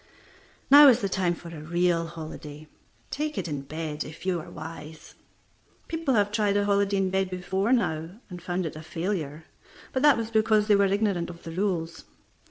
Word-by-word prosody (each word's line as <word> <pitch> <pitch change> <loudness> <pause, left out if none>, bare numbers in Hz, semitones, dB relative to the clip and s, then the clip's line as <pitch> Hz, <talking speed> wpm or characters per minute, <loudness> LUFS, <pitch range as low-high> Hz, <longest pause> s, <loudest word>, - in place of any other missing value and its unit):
Now 290 +1 +10
is 250 -3 +5
the 200 - 0
time 180 -2 0
for 170 - -11
a 160 -3 -9
real 170 +1 +1
holiday. 155 -2 -9 0.4
Take 300 +1 -3
it - - -2
in 145 -3 -3
bed, 155 +1 -5
if 155 +4 -11
you 185 -2 0
are - - -11
wise. 155 -1 -10 0.7
People 325 -6 -1
have 205 -1 +2
tried 210 -1 +1
a 205 - +1
holiday 200 0 +2
in 190 -1 0
bed 190 0 0
before 190 +4 -1
now, 160 -10 +1 0.2
and 180 -2 -9
found 180 0 -2
it 155 - -5
a 155 - -8
failure, 165 -2 -4 0.5
but 260 - 0
that 295 -2 +6
was 230 0 -4
because 215 -1 +3
they 210 -1 +4
were 200 0 +4
ignorant 195 -3 0
of 170 -1 -11
the 165 - -7
rules. 170 -3 -2
180 Hz, 190 wpm, -26 LUFS, 165-205 Hz, 0.7 s, Now